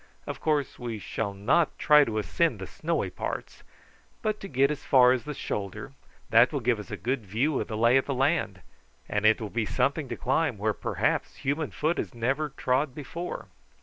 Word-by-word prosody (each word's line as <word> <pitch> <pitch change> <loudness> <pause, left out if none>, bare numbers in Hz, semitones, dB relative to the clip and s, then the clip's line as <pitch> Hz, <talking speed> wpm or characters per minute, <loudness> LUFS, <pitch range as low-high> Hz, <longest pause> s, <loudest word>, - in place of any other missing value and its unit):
"Of - - -6
course 150 -3 0
we 120 -2 -4
shall 100 +1 -3
not 130 +12 +2
try 150 -1 +6
to 110 -3 -3
ascend 105 - +1
the - - -6
snowy - - -2
parts, - - -5 0.6
but 215 -1 0
to 195 - -7
get 140 -1 +2
as 145 -1 -5
far 125 -2 +6
as 130 -2 0
the 150 -1 -5
shoulder; 105 +4 -4 0.4
that 115 +2 +6
will 145 - -1
give 120 -2 +1
us 105 - -9
a - - -4
good 125 0 -2
view 120 +9 0
of - - -4
the 110 - -4
lay 115 +3 +5
of 135 - +1
the 140 - -1
country, 135 - 0 0.4
and 105 +1 +2
it 110 - +4
will 110 -3 -5
be 115 -2 -1
something 140 +2 0
to - - -4
climb 135 -2 0
where 105 +2 0
perhaps - - -1
human 145 +3 -2
foot 160 +3 -1
has - - -4
never 135 +6 0
trod 130 0 0
before." 170 +4 -6
130 Hz, 205 wpm, -27 LUFS, 110-150 Hz, 0.6 s, try